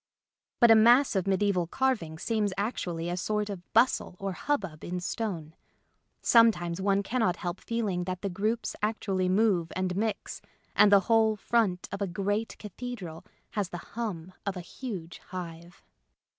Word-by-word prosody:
But 235 Hz, -2 st, +7 dB
a -, -, +9 dB
mass 240 Hz, +4 st, +6 dB
of 190 Hz, 0 st, 0 dB
mediaeval 190 Hz, -2 st, +2 dB
carving 215 Hz, -9 st, 0 dB
seems 210 Hz, +1 st, 0 dB
actually 175 Hz, -6 st, -2 dB
a 175 Hz, -, -1 dB
sort 210 Hz, +3 st, -1 dB
of 180 Hz, -3 st, -9 dB
bustle 230 Hz, -5 st, +3 dB
or 195 Hz, +1 st, -3 dB
hubbub 195 Hz, -, -2 dB
in 180 Hz, +1 st, -3 dB
stone. 175 Hz, -5 st, -4 dB, 0.7 s
Sometimes 190 Hz, -7 st, +4 dB
one 200 Hz, +1 st, +2 dB
cannot 220 Hz, -5 st, +1 dB
help 175 Hz, -1 st, -4 dB
feeling 205 Hz, -7 st, -1 dB
that 185 Hz, +1 st, -4 dB
the -, -, 0 dB
groups 215 Hz, +5 st, -1 dB
actually 195 Hz, -3 st, 0 dB
move 185 Hz, -4 st, +2 dB
and 185 Hz, -1 st, -1 dB
mix, 215 Hz, +2 st, -2 dB, 0.3 s
and 205 Hz, -, +6 dB
the 200 Hz, -1 st, +7 dB
whole 220 Hz, 0 st, +3 dB
front 210 Hz, -4 st, +1 dB
of 200 Hz, +1 st, -5 dB
a 200 Hz, -, +1 dB
great 205 Hz, +5 st, -2 dB
cathedral 210 Hz, -6 st, -7 dB, 0.3 s
has 205 Hz, -4 st, -2 dB
the 175 Hz, -, -5 dB, 0.2 s
hum 185 Hz, -6 st, -4 dB
of 200 Hz, -2 st, -3 dB
a -, -, -4 dB
huge 180 Hz, -3 st, -7 dB
hive. 175 Hz, -1 st, -8 dB
195 Hz, 155 wpm, -29 LUFS, 180-220 Hz, 0.7 s, a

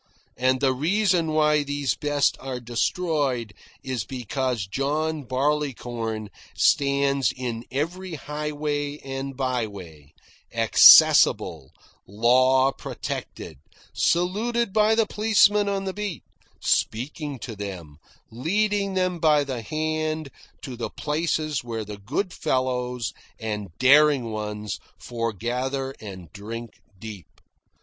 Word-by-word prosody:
And 130 Hz, +1 st, +1 dB
the 135 Hz, -2 st, +3 dB
reason 175 Hz, +4 st, +1 dB
why 150 Hz, -1 st, +3 dB
these 145 Hz, -1 st, -1 dB
best 145 Hz, -1 st, +1 dB
are 130 Hz, -2 st, -5 dB
destroyed 125 Hz, -, -1 dB, 0.3 s
is 130 Hz, -5 st, -3 dB
because 125 Hz, -2 st, -3 dB
John 145 Hz, +7 st, -2 dB
Barleycorn 120 Hz, -6 st, -2 dB, 0.3 s
stands 140 Hz, -1 st, +2 dB
on 120 Hz, -2 st, -4 dB
every 170 Hz, +6 st, -3 dB
highway 150 Hz, 0 st, -3 dB
and 135 Hz, 0 st, -5 dB
byway, 100 Hz, -, -4 dB, 0.4 s
accessible, -, -, +6 dB, 0.4 s
law 130 Hz, +5 st, +4 dB
protected, 80 Hz, -, -7 dB, 0.3 s
saluted 210 Hz, +6 st, 0 dB
by 215 Hz, +1 st, +4 dB
the 225 Hz, -1 st, +3 dB
policeman 210 Hz, -1 st, +3 dB
on 195 Hz, -1 st, -1 dB
the 190 Hz, -1 st, -3 dB
beat, 200 Hz, -, -5 dB, 0.4 s
speaking 140 Hz, +4 st, -1 dB
to 115 Hz, -1 st, -7 dB
them, 90 Hz, -7 st, -7 dB, 0.3 s
leading 200 Hz, -, 0 dB
them 185 Hz, -2 st, 0 dB
by 150 Hz, -2 st, +4 dB
the 130 Hz, -4 st, -4 dB
hand 155 Hz, +2 st, -2 dB, 0.3 s
to 130 Hz, -, -6 dB
the 120 Hz, -, -4 dB
places 155 Hz, -2 st, -1 dB
where 115 Hz, -2 st, -4 dB
the 105 Hz, 0 st, -8 dB
good 150 Hz, -, -3 dB
fellows 125 Hz, -2 st, -1 dB, 0.3 s
and 105 Hz, -3 st, -4 dB
daring 140 Hz, -2 st, +5 dB
ones 105 Hz, -1 st, -4 dB, 0.2 s
forgather 125 Hz, +4 st, -3 dB
and 95 Hz, -6 st, -10 dB
drink 115 Hz, +2 st, -8 dB, 0.2 s
deep. 105 Hz, -3 st, -9 dB
135 Hz, 110 wpm, -24 LUFS, 115-155 Hz, 0.4 s, accessible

